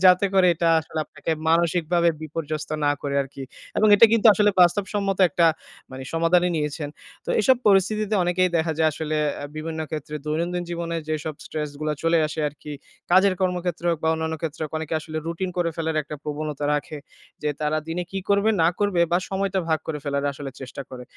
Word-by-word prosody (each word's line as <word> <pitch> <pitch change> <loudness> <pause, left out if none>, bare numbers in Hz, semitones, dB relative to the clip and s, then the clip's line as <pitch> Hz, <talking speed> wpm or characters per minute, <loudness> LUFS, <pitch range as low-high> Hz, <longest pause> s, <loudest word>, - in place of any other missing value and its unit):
যাতে 185 +2 +6
করে 190 -1 +5
এটা 170 +1 +1
আসলে 160 0 -7
আপনাকে - - -6 0.2
মানসিকভাবে 170 +1 +2
বিপর্যস্ত 155 -1 -4
না 145 - +4
করে 140 -1 -2
আরকি। 135 0 -9 0.4
এবং 215 - +4
এটা 225 +3 +8
কিন্তু 230 0 +4
আসলে 210 +1 +4
বাস্তবসম্মত 195 +2 +2
একটা 170 +2 +3 0.4
মানি 130 0 -7
সমাধানই 175 +2 +3
নিয়েছেন। 150 0 -2 0.4
তো - - -12
এইসব 260 - +4
পরিস্থিতিতে 210 +2 +2
অনেকেই 180 +1 +2
দেখা 160 0 +1
যায় 160 - +4
আসলে 155 0 -3 0.3
আ - - -4
বিভিন্ন 160 +1 -4
ক্ষেত্রে 150 -1 -5
দৈনন্দিন 170 +3 -1
জীবনে 170 -1 -3
যেসব 155 -1 -3
স্ট্রেস 150 -1 -4
গুলা 155 0 -1
চলে 165 0 +3
আসে 155 +1 -5
আরকি 150 +1 -10 0.4
কাজের 190 +1 +5
কর্মক্ষেত্রে 180 -2 -1
হোক 165 - -1
বা - - +3
অন্যান্য 160 0 -2
ক্ষেত্রে 160 0 -4
হোক 155 - -8
অনেকে 160 0 -4
আসলে 155 0 -7
রুটিন 170 +3 -3
করে 175 -1 +1
ফেলার 160 -1 -2
একটা 150 +1 -8
প্রবণতা 150 -1 -4
রাখে। 150 +1 -4 0.4
যে 150 - 0
তারা 155 +1 0
দিনে 170 +2 -2
কি 195 - -2
করবে 200 +2 +3
না 165 - +5
করবে 200 -4 +1
বা 175 - +4
সময়টা 195 0 -1
ভাগ 160 -1 +2
করে 155 -2 -3
ফেলার 140 -1 -1
আসলে 140 0 -7
চেষ্টা 130 +1 -7
করে। 125 -1 -8
165 Hz, 190 wpm, -24 LUFS, 155-180 Hz, 0.4 s, এটা